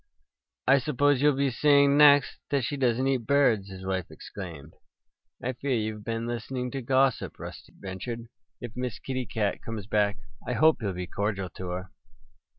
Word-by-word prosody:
"I 135 Hz, +2 st, +6 dB
suppose 145 Hz, 0 st, +2 dB
you'll 145 Hz, -1 st, +4 dB
be 140 Hz, 0 st, +1 dB
saying 140 Hz, +2 st, +4 dB
next 145 Hz, -2 st, +6 dB
that 140 Hz, -3 st, +1 dB
she 145 Hz, -, -2 dB
doesn't 130 Hz, -1 st, +1 dB
eat 130 Hz, -4 st, 0 dB
birds!" 120 Hz, -9 st, +3 dB
his 95 Hz, -1 st, -9 dB
wife 95 Hz, -2 st, -2 dB
exclaimed. 80 Hz, -6 st, -9 dB, 0.7 s
"I 130 Hz, +2 st, -1 dB
fear 135 Hz, +1 st, -1 dB
you've 110 Hz, -1 st, -3 dB
been 115 Hz, +1 st, -3 dB
listening 125 Hz, +2 st, -4 dB
to 135 Hz, -, -4 dB
gossip," 130 Hz, +1 st, +1 dB
Rusty -, -, -9 dB
ventured. 115 Hz, +5 st, -6 dB, 0.3 s
"If 120 Hz, -, -7 dB
Miss 125 Hz, -2 st, -3 dB
Kitty 130 Hz, -2 st, -4 dB
Cat 105 Hz, -3 st, -1 dB
comes 110 Hz, -3 st, -6 dB
back 105 Hz, -1 st, +1 dB, 0.3 s
I -, -, 0 dB
hope 160 Hz, -3 st, +4 dB
you'll 100 Hz, -3 st, -1 dB
be 90 Hz, 0 st, -4 dB
cordial 100 Hz, 0 st, -2 dB
to 90 Hz, -, -8 dB
her." 90 Hz, +1 st, -5 dB
120 Hz, 170 wpm, -27 LUFS, 100-135 Hz, 0.7 s, I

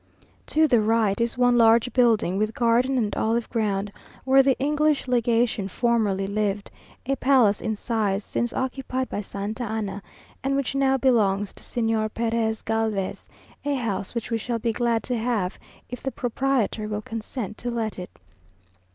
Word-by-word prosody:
To 315 Hz, +1 st, +3 dB
the 240 Hz, -6 st, +4 dB
right 215 Hz, -1 st, +2 dB
is 235 Hz, +1 st, 0 dB
one 245 Hz, -1 st, +4 dB
large 230 Hz, +2 st, +4 dB
building, 225 Hz, -7 st, +3 dB
with 215 Hz, +1 st, -1 dB
garden 245 Hz, +3 st, +2 dB
and 215 Hz, -4 st, 0 dB
olive 230 Hz, +1 st, 0 dB
ground, 205 Hz, -3 st, -1 dB, 0.3 s
where 270 Hz, +1 st, +6 dB
the 270 Hz, -1 st, +2 dB
English 300 Hz, +1 st, +1 dB
legation 235 Hz, -4 st, +1 dB
formerly 210 Hz, -3 st, +1 dB
lived, 205 Hz, 0 st, -2 dB, 0.3 s
a 275 Hz, +2 st, 0 dB
palace 250 Hz, -7 st, +3 dB
in 220 Hz, -1 st, -1 dB
size, 210 Hz, -3 st, -1 dB
since 240 Hz, +3 st, -2 dB
occupied 260 Hz, -1 st, -3 dB
by 205 Hz, -, -3 dB
Santa 205 Hz, +4 st, -5 dB
Anna, 210 Hz, -3 st, -3 dB, 0.4 s
and 275 Hz, +1 st, 0 dB
which 275 Hz, -1 st, -1 dB
now 270 Hz, -1 st, +2 dB
belongs 210 Hz, -6 st, +2 dB
to -, -, -14 dB
Señor 225 Hz, -2 st, -1 dB
Perez 225 Hz, -1 st, -1 dB
Galvez; 220 Hz, -3 st, -2 dB, 0.3 s
a 285 Hz, 0 st, 0 dB
house 220 Hz, -5 st, -3 dB
which 235 Hz, 0 st, -4 dB
we 225 Hz, -, +1 dB
shall 235 Hz, +2 st, -2 dB
be 230 Hz, 0 st, -1 dB
glad 235 Hz, -1 st, 0 dB
to 250 Hz, -, -2 dB
have, 220 Hz, -5 st, -1 dB, 0.3 s
if 250 Hz, -, -7 dB
the 270 Hz, -, -2 dB
proprietor 245 Hz, -3 st, -1 dB
will 210 Hz, 0 st, -4 dB
consent 225 Hz, -1 st, -5 dB
to 245 Hz, -, -3 dB
let 225 Hz, -4 st, -3 dB
it. 180 Hz, -, -7 dB
230 Hz, 165 wpm, -24 LUFS, 210-250 Hz, 0.4 s, where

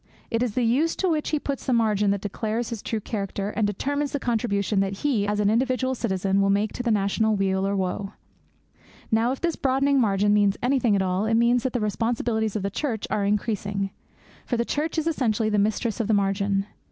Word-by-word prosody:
It 230 Hz, -, 0 dB
is 245 Hz, -4 st, -1 dB
the 250 Hz, -, +1 dB
use 280 Hz, +8 st, +2 dB
to 380 Hz, -, 0 dB
which 310 Hz, -2 st, 0 dB
he 310 Hz, -, +1 dB
puts 280 Hz, -2 st, -4 dB
that 255 Hz, -, +2 dB
margin 210 Hz, -3 st, +2 dB
that 200 Hz, -1 st, 0 dB
declares 220 Hz, +3 st, -3 dB
his 225 Hz, -3 st, -4 dB
true 225 Hz, -, -2 dB
character 200 Hz, -1 st, -3 dB
and 215 Hz, -1 st, 0 dB
determines 285 Hz, +8 st, -2 dB
the 285 Hz, -, 0 dB
contribution 215 Hz, -5 st, 0 dB
that 195 Hz, 0 st, 0 dB
he, 225 Hz, -8 st, +2 dB
as 210 Hz, 0 st, 0 dB
an 205 Hz, 0 st, +3 dB
individual 260 Hz, +2 st, +1 dB
citizen, 195 Hz, -5 st, 0 dB
will 195 Hz, -, +2 dB
make 205 Hz, +2 st, +1 dB
to -, -, -4 dB
the 245 Hz, -, -1 dB
national 215 Hz, +1 st, +2 dB
weal 195 Hz, -1 st, 0 dB
or 200 Hz, -, 0 dB
woe. 195 Hz, +1 st, -2 dB, 1.0 s
Now, 225 Hz, +2 st, +3 dB
if 265 Hz, -, -4 dB
this 340 Hz, -2 st, 0 dB
broadening 275 Hz, +1 st, +2 dB
margin 205 Hz, -2 st, +2 dB
means 205 Hz, -1 st, +3 dB
anything 250 Hz, -4 st, +2 dB
at 195 Hz, -, +2 dB
all, 185 Hz, +2 st, 0 dB
it 225 Hz, -, +2 dB
means 235 Hz, +1 st, +3 dB
that 260 Hz, +1 st, -2 dB
the 245 Hz, -, 0 dB
responsibilities 220 Hz, 0 st, -1 dB
of 210 Hz, -, -2 dB
the 200 Hz, -, -2 dB
Church 230 Hz, -1 st, -2 dB
are 205 Hz, -, +1 dB
increasing. 200 Hz, -1 st, -1 dB, 0.5 s
For 240 Hz, -, -2 dB
the 235 Hz, -, 0 dB
Church 305 Hz, +5 st, -2 dB
is 315 Hz, -, 0 dB
essentially 230 Hz, -9 st, +1 dB
the 210 Hz, -1 st, +2 dB
Mistress 215 Hz, +1 st, 0 dB
of 225 Hz, -, 0 dB
the 220 Hz, -, +3 dB
Margin. 195 Hz, 0 st, +1 dB
220 Hz, 220 wpm, -25 LUFS, 200-245 Hz, 1.0 s, an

